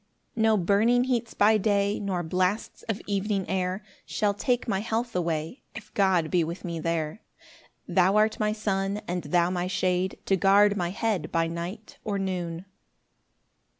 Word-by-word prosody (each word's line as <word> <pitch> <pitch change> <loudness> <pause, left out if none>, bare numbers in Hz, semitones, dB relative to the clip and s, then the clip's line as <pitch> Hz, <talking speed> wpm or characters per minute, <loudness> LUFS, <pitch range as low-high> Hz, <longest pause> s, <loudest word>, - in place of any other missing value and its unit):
3 225 - -3
No 220 -1 +4
burning 210 +7 +3
heats 245 -3 -1
by 215 +1 +4
day, 200 0 +1
Nor 190 -4 -2
blasts 185 +5 -1
of 220 -1 -2
evening 200 -1 -1
air, 185 +1 -1 0.2
Shall 210 -1 0
take 245 +4 -1
my 195 -4 0
health 230 +2 -2
away, 165 - -2
If 215 -1 -10
God 185 -5 +2
be 175 -2 +3
with 170 +4 -5
me 170 -2 -3
there. 160 +2 -2 0.7
Thou 190 +1 +3
art 215 +1 +3
my 210 -1 +1
sun, 200 -1 -1
And 180 -1 -3
thou 175 +3 +2
my 180 0 -1
shade, 185 0 0
To 195 - +3
guard 200 +2 +5
my 175 -3 -1
head 200 -4 -2
By 165 0 +2
night 170 +6 -6
or 205 -2 -2
noon. 180 -3 -3
195 Hz, 165 wpm, -27 LUFS, 175-210 Hz, 0.7 s, guard